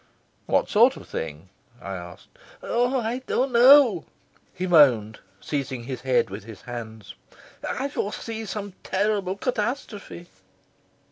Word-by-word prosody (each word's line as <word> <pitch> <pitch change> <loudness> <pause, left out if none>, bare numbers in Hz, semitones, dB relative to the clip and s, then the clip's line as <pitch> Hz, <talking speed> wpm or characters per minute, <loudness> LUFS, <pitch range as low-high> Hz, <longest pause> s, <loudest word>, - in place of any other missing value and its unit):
"What - - +2
sort - - +4
of - - -12
thing?" 80 +3 -6 0.3
I 95 -6 -6
asked. 90 -1 -9 0.3
"Oh, 245 +2 +1
I 235 +2 -2
don't 260 +1 0
know," 245 - +7 0.5
he 185 - -4
moaned, 125 - +4 0.2
seizing 135 -4 -4
his 125 0 -6
head 130 -6 +1
with 100 +1 -7
his 110 -3 -11
hands. 110 -3 -8 0.6
"I 270 - -2
foresee 225 -3 -4
some 205 -1 -5
terrible 195 -1 0
catastrophe." 215 -5 -4
185 Hz, 125 wpm, -25 LUFS, -, 0.6 s, know